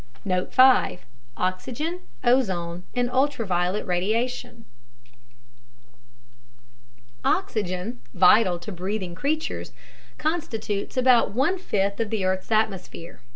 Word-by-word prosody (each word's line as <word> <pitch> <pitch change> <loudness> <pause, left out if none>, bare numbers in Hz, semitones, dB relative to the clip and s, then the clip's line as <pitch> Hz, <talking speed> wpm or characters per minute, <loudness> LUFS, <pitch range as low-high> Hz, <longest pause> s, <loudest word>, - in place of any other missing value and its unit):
Note 185 -1 -1
5: 255 -7 +5 0.3
Oxygen, 255 - -2 0.2
Ozone 185 -9 +1
and 245 0 +1
Ultraviolet 210 -9 0
Radiation 230 +6 -2 2.6
Oxygen, 215 - -1
vital 180 - +5
to 175 +5 -8
breathing 185 0 -4
creatures, 300 - -3 0.4
constitutes 225 -11 -3
about 250 -5 +4
one 325 +9 +1
fifth 200 - -1
of 225 -2 -1
the 205 -4 -1
earth's 185 +3 -1
atmosphere. 200 -6 -2
215 Hz, 90 wpm, -25 LUFS, 185-255 Hz, 2.6 s, 5